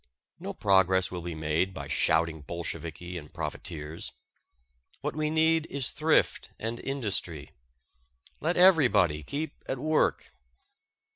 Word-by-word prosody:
No - - -5
progress 95 -2 +3
will 90 -1 -4
be 85 -1 -5
made 80 +5 0
by - - -6
shouting 80 -1 +1
Bolsheviki 85 +2 -5
and 75 -2 -14
profiteers. 80 -1 -5 0.9
What - - -3
we 155 0 0
need 160 0 +3
is 135 -2 -1
thrift 155 +2 +2
and 115 +1 -4
industry. 100 - -3 0.9
Let 165 +4 0
everybody 130 - +5
keep 145 - -5
at 135 - -2
work. 155 +4 +1
95 Hz, 120 wpm, -28 LUFS, -, 0.9 s, everybody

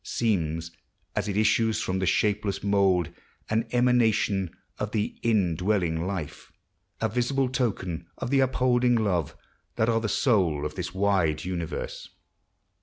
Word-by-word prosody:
Seems, 85 -7 -1 0.4
as - - -1
it 100 -1 -2
issues 110 +1 +2
from 95 +1 -1
the 95 - 0
shapeless 100 +1 +1
mould. 95 -4 +2 0.4
An 110 +1 +1
emanation 115 -6 +2 0.3
of - - -3
the 105 -1 -1
indwelling 90 -5 +1
Life. 90 -7 -5 0.5
A 110 - +2
visible 125 +4 0
token 100 - -2
of 125 - -4
the 140 - +4
upholding 125 -2 +3
Love, 95 -9 0 0.4
That 110 - +1
are 115 -1 +2
the 110 - -1
soul 90 - +2
of 75 - -3
this 90 0 -4
wide 95 -6 +1
universe. 85 -3 -4
100 Hz, 135 wpm, -26 LUFS, 90-115 Hz, 0.5 s, the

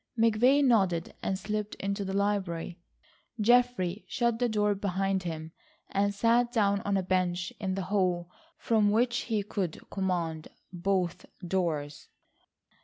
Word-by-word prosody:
McVay 230 +5 +4
nodded 190 -10 +2
and 190 - -1
slipped 210 +1 -3
into 200 +1 -3
the 190 0 -3
library. 190 -4 -1 0.6
Geoffrey 225 -4 +2
shut 235 -2 0
the 245 -1 +1
door 210 -1 +2
behind 195 -1 -1
him, 160 -2 -5 0.4
and 200 +1 +2
sat 235 +4 +2
down 200 -4 +2
on 200 -1 0
a 190 - 0
bench 180 -1 0
in 190 -3 -2
the 195 - -2
hall 180 -3 +1 0.3
from 215 -3 +2
which 240 +3 +2
he 215 -2 +1
could 195 -5 -4
command 170 -5 -2 0.3
both 180 -1 -1 0.2
doors. 160 -5 -2
195 Hz, 135 wpm, -29 LUFS, 180-215 Hz, 0.6 s, McVay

